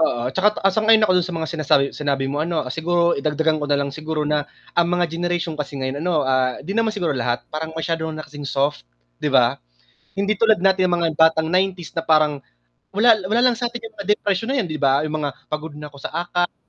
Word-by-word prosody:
Oo, 125 -5 0
'tsaka 210 +5 +2
ta - - -4
ah, 195 - +4
sang-ayon 220 +1 +5
ako 185 - +3
dun 175 - -3
sa 175 - -4
mga 160 -1 -3
sinasabi 150 -3 +3
sinabi 140 -2 -1
mo 140 +2 -2
ano, 165 -1 -1
siguro, 170 +2 +1
eh, - - -2
dagdagan 155 +1 0
ko 145 - -3
nalang, 140 -1 0
siguro 155 +1 -3
na 150 0 -1 0.2
ang 170 0 +2
mga 175 0 +1
generation 175 0 -2
kasi 150 -2 -5
ngayon 130 +1 -3
ano, 165 -3 +1
ah, 130 -1 +1
'di 195 - -4
naman 225 +1 +1
siguro 175 -6 0
lahat, 120 -2 -2
parang 160 +1 -5
masyado 160 0 -2
na 155 -1 -6
kasing 145 -2 -8
soft, 135 - -1 0.3
'di - - 0
ba? - - +3 0.6
Hindi 200 +2 +1
tulad 220 +1 +3
natin 185 0 +3
mga 170 -2 +1
batang 160 0 +4
90s, 180 0 -1
na 165 - -1
parang 155 -3 +2 0.5
wala 220 +2 +5
wala 225 +5 +2
lang 235 - -3
satin 240 -1 -3
yung 225 -1 -10
mga 200 -1 -7
depression 205 0 -1
na 265 - -1
'yan - - -4
'di 155 - -3
ba, 140 0 +3
yung 155 0 -2
mga 145 -2 -1 0.2
pagod 150 0 -4
na 150 0 -9
ako 140 - -15
sa - - -6
acads, 175 +1 -1
160 Hz, 230 wpm, -21 LUFS, 145-185 Hz, 0.6 s, sang-ayon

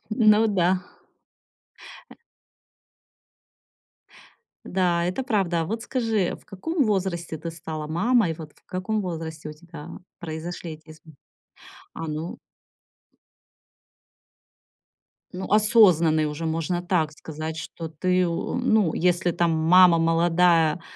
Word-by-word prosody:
Ну 215 -1 +4
да. 185 -2 +1 1.3
Э. - - -13 2.5
Да, 175 -2 0
это 180 +9 -2
правда. 195 -9 0
А - - -1
вот 225 +5 -4
скажи, 225 -7 -1
в - - -23
каком 285 - -2
возрасте 185 -6 -2
ты 165 +2 -6
стала 160 -2 -6
мамой? 185 +4 +2
Вот 155 -2 -10
в - - -29
каком 200 +3 -2
возрасте 160 -3 -6
у - - -8
тебя 165 0 -12 0.3
произошли 165 +1 -6
эти 155 0 -14
изм 155 0 -15 0.8
А, 165 - -6
ну. 155 +2 -5 3.0
Ну, 185 0 -6
осознанный 180 -8 +4
уже 150 +2 -4
можно 165 +2 -1
так 175 -4 0
сказать, 155 +1 -7
что 165 0 -7
ты, 180 +3 0
у 170 -1 -3
м, 220 -9 +2
если 175 0 +1
там 170 0 +1
мама 170 +2 +5
молодая, 165 0 +3
170 Hz, 115 wpm, -24 LUFS, 160-190 Hz, 3.0 s, мама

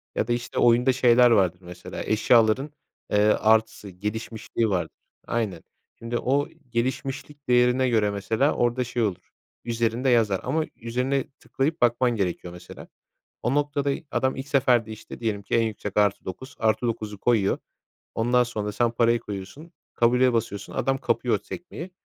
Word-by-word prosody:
ya - - 0
da, 120 - +1
işte, 120 0 -3
oyunda 120 +2 +4
şeyler 125 -1 +5
vardır 95 -5 +3
mesela, 90 0 -10
ııı, - - -4
eşyaların, 115 +5 +3 0.4
eee, - - +3
artısı, 110 0 +2
gelişmişliği 110 +3 -3
vardır. 90 -3 -2 0.3
Aynen. 105 -8 -2 0.4
Şimdi 115 +1 -3
o 140 +4 +1 0.2
gelişmişlik 135 +4 -3
değerine 125 +1 +3
göre 110 -3 +2
mesela 110 +8 0
orada 120 +1 +1
şey 120 0 -2
olur, 95 -4 -3 0.3
üzerinde 115 +2 0
yazar 110 -6 +3
ama 155 +5 0
üzerine 125 +4 -1
tıklayıp 150 +3 -2
bakman 120 +1 +3
gerekiyor, 90 -3 -3
mesela. 90 - -11 0.6
O 125 +3 0
noktada, 145 -1 0 0.2
adam 130 0 0
ilk 135 +1 -6
seferde, 125 -5 +2
işte, 110 +2 -10
diyelim 105 -3 -2
ki - - -4
en 115 - +4
yüksek 105 -2 -4
+9. 105 +4 -1
+9'u 110 -2 -1
koyuyor, 110 -5 +2 0.6
ondan 120 +2 +3
sonra 110 -3 -4
da 105 - -2
sen 120 +2 +1
parayı 115 0 +2
koyuyorsun, 105 - -8 0.2
kabule 125 +1 +3
basıyorsun, 100 -3 -3
adam 135 +2 0
kapıyor 120 -5 0
sekmeyi, 175 +1 -8
115 Hz, 150 wpm, -25 LUFS, 105-125 Hz, 0.6 s, şeyler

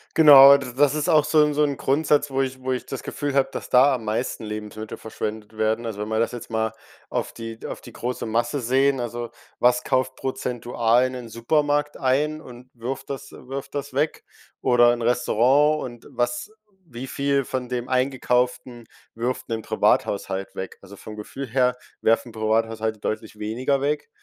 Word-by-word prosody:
Genau, 140 -3 +10
d 130 -3 -7
das 145 +1 +4
ist 150 +2 -1
auch 155 -4 +5
so 150 +1 +4
'n 150 0 +3
so 150 +1 +2
'n 140 -2 0
Grundsatz, 145 +1 +2
wo 135 0 0
ich 130 -1 -3
wo 130 0 -1
ich 125 - -4
das 135 - -6
Gefühl 145 -1 -4
habe, 135 -1 +3
dass - - -6
da 130 +2 +5
am 120 - -6
meisten 110 +2 -2
Lebensmittel 105 0 -6
verschwendet 110 0 -6
werden. 110 +2 0
Also, 105 -2 -4
wenn 105 - -4
man 110 0 0
das 115 - 0
jetzt 120 - -8
mal 110 -1 -1 0.4
auf - - -2
die 115 -1 -8
auf - - -5
die - - -13
große 125 +1 -4
Masse 120 +5 0
sehen, 135 +2 +2
also 120 0 -4 0.3
was 125 0 +3
kauft 130 -1 0
prozentual 120 -2 0
in 130 - -7
den 125 -3 -7
Supermarkt 145 +5 0
ein 150 +4 0
und 125 -1 -13
wirft 125 +3 -6
das 140 0 -6
wirft 135 +2 -8
das 140 -2 -4
weg? 150 +3 -1 0.3
Oder 120 -1 +5
'n 120 - -2
Restaurant 125 +5 +3
und 120 -2 -9
was 120 +10 -2 0.3
wie 130 -2 -8
viel 140 0 0
von 125 -1 -4
dem 125 -1 -3
Eingekauften 125 -1 0 0.3
wirft 120 +3 -3
'nen 115 -1 -3
Privathaushalt 95 -2 0
weg? 95 - -6
Also, 100 0 -13
vom 110 - -9
Gefühl 130 +6 -7
her 125 +1 +1 0.2
werfen 115 +1 +1
Privathaushalte 110 0 -1
deutlich 110 0 -4
weniger 125 +6 0
weg. 145 +1 -1
125 Hz, 185 wpm, -24 LUFS, 115-140 Hz, 0.4 s, Genau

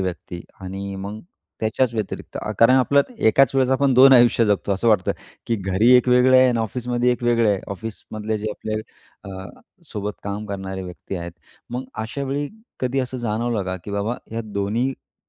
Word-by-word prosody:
व्यक्ती 85 -1 -5 0.2
आणि 95 +1 -6
मग 100 +3 -6 0.4
त्याच्याच 115 +3 +1
व्यतिरिक्त 110 -3 -5
अ, - - -4
कारण 115 +3 +6
आपलं 140 +2 +4 0.2
एकाच 135 +4 +4
वेळेस 130 -1 +2
आपण 135 0 +2
2 135 +2 +8
आयुष्य 120 -2 +6
जगतो. 100 0 +1
असं 100 +4 +1
वाटतं, 105 -5 +3 0.3
की 115 - 0
घरी 95 +5 +2
एक 125 - +2
वेगळं 125 +1 +5
आहे 130 0 +6
आणि 120 -2 +1
ऑफिसमध्ये 120 +2 0
एक 125 - -5
वेगळं 115 -2 +3
आहे. 100 -2 0
ऑफिसमधले 110 +1 -5
जे 110 +1 -3
आपले 110 +1 -5 0.6
अ, 95 -1 -7 0.4
सोबत 105 -1 -3
काम 100 +1 -4
करणारे 95 -1 -5
व्यक्ती 90 +1 -7
आहेत. 85 -1 -6 0.4
मग 125 +2 -4 0.2
अशावेळी 140 +4 -3 0.3
कधी 130 +1 0
असं 130 0 -4
जाणवलं 115 -1 -1
का 95 0 -3
की 105 - -7
बाबा 100 +4 -1 0.2
ह्या 115 +1 -3
दोन्हीकडच्या 110 +5 -3
110 Hz, 175 wpm, -22 LUFS, 100-125 Hz, 0.6 s, 2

